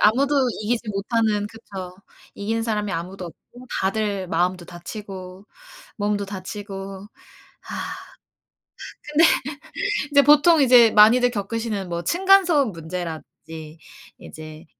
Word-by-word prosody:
아무도 270 +7 +3 0.3
이기지 230 +1 -2
못하는 210 +1 0
그쵸. 195 -5 -9 0.4
이기는 225 +3 -2
사람이 210 -3 -2
아무도 180 +2 -5
없고 245 +9 -15
다들 200 -1 -1
마음도 180 +1 0
다치고 185 +2 -9 0.5
몸도 205 -1 -1
다치고 195 0 -7 0.6
아. - - -5 1.1
근데 300 +2 +2 0.9
이제 285 0 +7
보통 295 +3 +6
이제 245 -3 +7
많이들 240 +4 +6
겪으시는 210 -2 -3
뭐 170 0 -3
층간소음 350 - +4
문제라든지 160 -2 -8 0.4
이제 155 0 -11
205 Hz, 255 characters per minute, -23 LUFS, 185-235 Hz, 1.1 s, 이제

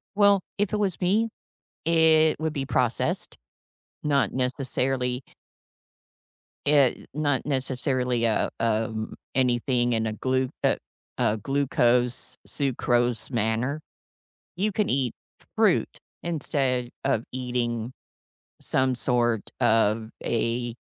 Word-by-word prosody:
Well, 200 -1 +5 0.2
if 205 -1 0
it 210 - +1
was 195 -5 0
me, 210 +6 +2 0.6
it 160 -1 +4
would 160 0 -1
be 140 -3 -2
processed, 125 -3 -1 0.7
not 140 -2 +2
necessarily 130 -1 -1 1.5
eh, 145 -3 +3
not 145 -2 0
necessarily, 130 -3 0
uh, 110 -2 +1
um, 110 -1 -1 0.2
anything 125 -1 +2
in 110 -1 +1
a 110 - -2
glu 130 +3 0
a - - +3 0.4
a 105 - +2
glucose, 125 -1 +1
sucrose 120 -4 0
manner. 115 +5 0 0.7
You 205 +4 0
can 210 +1 0
eat 130 -3 +1 0.4
fruit - - +2 0.2
instead 135 -6 -1 0.2
of 135 -5 +1
eating 120 -2 -2 0.7
some 130 -1 +1
sort 120 -3 0
of 110 0 +2
a 120 +1 -1
125 Hz, 105 wpm, -26 LUFS, 120-145 Hz, 1.5 s, Well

